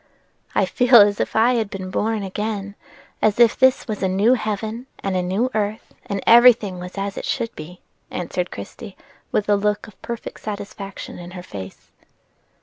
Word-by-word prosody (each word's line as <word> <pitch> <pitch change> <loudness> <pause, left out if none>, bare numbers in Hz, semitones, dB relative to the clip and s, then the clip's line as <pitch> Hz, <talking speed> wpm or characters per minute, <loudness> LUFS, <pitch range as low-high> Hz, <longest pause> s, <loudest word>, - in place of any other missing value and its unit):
"I - - +3
feel 250 -1 +3
as 205 -2 +7
if - - -2
I 230 +3 +4
had 225 -4 0
been 190 -3 -6
born 220 +1 -1
again; 200 +1 -4 0.5
as 215 +1 +2
if 235 -2 +6
this 260 0 +3
was 215 -2 -4
a 190 - +2
new 200 +6 +3
heaven 220 +1 -3 0.2
and 195 -1 -1
a 185 - +1
new 195 +8 0
earth, 215 +1 -3
and 200 -2 -3
every 240 +2 +9
thing 200 -5 -7
was 180 +2 -8
as 195 0 -3
it - - -6
should 230 -1 -2
be," 175 +4 -10 0.3
answered 180 0 -3
Christie, 100 - -9 0.3
with 210 - 0
a 205 - +4
look 210 +1 0
of 210 - -17
perfect 235 -1 -6
satisfaction 200 -2 -7
in 175 0 -9
her 180 - -7
face. 95 - -10
205 Hz, 185 wpm, -22 LUFS, 190-225 Hz, 0.5 s, every